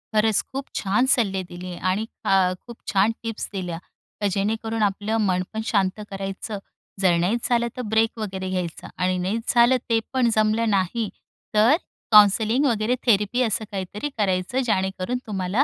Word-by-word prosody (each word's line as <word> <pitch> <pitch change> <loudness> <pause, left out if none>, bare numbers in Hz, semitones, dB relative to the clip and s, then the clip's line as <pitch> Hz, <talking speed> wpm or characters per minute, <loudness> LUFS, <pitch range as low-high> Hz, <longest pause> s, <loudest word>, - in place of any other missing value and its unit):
खरंच 215 0 +3
खूप 270 +1 -3
छान 210 +6 +1
सल्ले 195 -6 0
दिले 180 0 -7 0.2
आणि 210 +4 -1 0.2
ख - - 0 0.4
खूप 235 -1 -9 0.2
छान 200 +3 +4
टिप्स 225 -2 -4
दिल्या. 180 -4 -4 0.4
तर 205 - +2
जेणेकरून 220 +3 -1
आपलं 205 +2 0
मन 185 -1 +1
पण 220 - -2
शांत 195 -2 +1
करायचं. 195 +2 -5 0.4
जर 185 -3 +4
नाहीच 200 +8 0
झालं 235 -1 +2
तर - - -2
ब्रेक 225 +1 +2
वगैरे 190 -3 -4
घ्यायचा 180 -3 -4
आणि 185 0 +1
नाहीच 200 +6 -1
झालं, 240 +2 +6
ते 230 -1 +3
पण 255 -3 +3
जमलं 215 +1 +2
नाही 200 +2 0 0.5
तर 220 +7 +6 0.4
काउंसलिंग 215 +5 +6
वगैरे 230 -1 +1
थेरपी 215 +1 +3
असं 220 -1 0
काहीतरी 200 +7 -4
करायचं 195 +4 0
जेणेकरून 190 +1 -1
तुम्हाला 195 +4 +1
210 Hz, 155 wpm, -23 LUFS, 190-230 Hz, 0.5 s, झालं